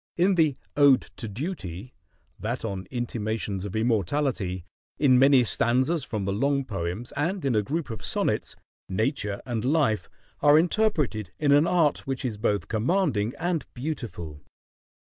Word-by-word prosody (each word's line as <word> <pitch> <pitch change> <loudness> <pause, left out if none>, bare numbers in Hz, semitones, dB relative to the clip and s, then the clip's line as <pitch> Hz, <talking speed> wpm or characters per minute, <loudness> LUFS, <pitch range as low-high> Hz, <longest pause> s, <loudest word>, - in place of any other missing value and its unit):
In 185 +3 +4
the 155 -6 +2 0.2
"Ode 140 -3 +6
to 115 - -5
Duty," 115 - -6 0.5
that 115 +3 -3
on 95 -3 -4
"Intimations 110 -5 -3
of 100 - -6
Immortality," 110 - 0 0.3
in 130 -4 +5
many 135 -1 +6
stanzas 130 +7 +1
from 105 -5 -3
the 100 - -1
long 140 +5 +1
poems, 95 +2 -4
and 165 +4 -2
in 135 - +2
a 105 - +3
group 145 +5 -3
of 110 -2 -7
sonnets, - - -1 0.3
Nature 105 0 -1
and 115 -4 -2
Life 135 -6 +1 0.3
are 145 +1 +7
interpreted 160 - +1
in 145 -2 +2
an 145 +3 +5
art 160 -7 +2
which 135 0 -3
is 115 -4 -2
both 105 -2 0
commanding 120 - 0
and 170 -3 -1
beautiful. 120 - -5
125 Hz, 145 wpm, -26 LUFS, 105-145 Hz, 0.5 s, are